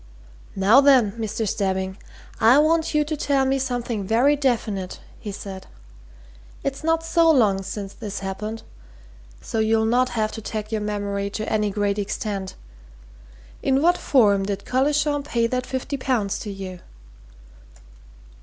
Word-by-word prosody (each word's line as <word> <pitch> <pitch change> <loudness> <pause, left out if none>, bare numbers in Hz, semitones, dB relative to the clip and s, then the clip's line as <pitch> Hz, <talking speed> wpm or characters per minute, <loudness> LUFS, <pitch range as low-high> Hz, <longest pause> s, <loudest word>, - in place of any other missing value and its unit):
"Now, 205 +8 +6
then, 260 -7 +5
Mr. 220 0 -3
Stebbing, 190 -1 -1 0.4
I 230 +4 +6
want 320 +1 +2
you 300 - +4
to 310 +1 -2
tell 275 -2 +1
me 270 +1 +1
something 245 -5 -2
very 240 +9 +3
definite," 225 -9 -1 0.2
he 210 - -6
said. 195 -1 -8 1.0
"It's 275 +2 -3
not 325 0 +1
so 330 0 +3
long 215 -10 +4
since 195 0 -6
this 210 -3 -6
happened, 210 +3 -5 0.8
so 225 - -3
you'll 220 0 +2
not 250 +3 +2
have 215 -1 +1
to 220 - -7
tag 215 0 -5
your 220 -1 -1
memory 200 -1 -2
to 215 +2 -5
any 210 -1 +1
great 205 0 -1
extent. 200 -1 -4 1.1
In 270 0 +2
what 345 +4 +4
form 205 - +3
did 200 -1 -4
Collishaw 290 +3 +1
pay 240 -5 0
that 250 +2 -2
fifty 265 +2 -3
pounds 240 -7 -1
to 210 - -6
you?" 190 -2 -7
220 Hz, 145 wpm, -23 LUFS, 200-270 Hz, 1.1 s, Now